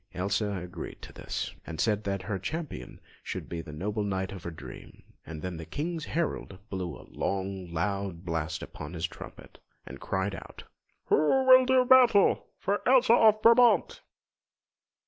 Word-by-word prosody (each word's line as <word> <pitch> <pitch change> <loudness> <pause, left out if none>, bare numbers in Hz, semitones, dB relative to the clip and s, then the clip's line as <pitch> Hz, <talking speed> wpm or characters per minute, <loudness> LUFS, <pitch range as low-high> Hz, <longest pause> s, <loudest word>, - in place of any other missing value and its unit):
Elsa 100 +3 -1
agreed 90 -1 -7
to - - -10
this, - - -5
and 80 -2 -7
said 105 -2 +1
that 100 -1 -2
her 100 -2 -3
Champion 155 - -6 0.2
should - - -6
be 85 -1 -5
the 75 - -10
noble 105 +8 -3
Knight 95 -2 -2
of 95 -2 -8
her 85 - -5
dream; 70 -7 -11 0.2
and 80 -2 -8
then 90 -2 -4
the 80 - -7
King's 155 - -4
herald 160 - -3
blew 95 -3 -4
a - - -14
long, 95 -2 -3
loud 95 +1 -3
blast 80 -1 -3
upon 80 +2 -8
his 85 -1 -2
trumpet, - - -11 0.3
and 70 - -10
cried 95 +1 -2
out: - - -10 0.5
"Who 260 - +3
will 255 0 +8
do 260 -1 +4
battle 245 -6 +5
for 200 +2 -1
Elsa 255 -2 +6
of 215 -2 +5
Brabant?" 235 +1 +5
100 Hz, 165 wpm, -28 LUFS, -, 0.5 s, will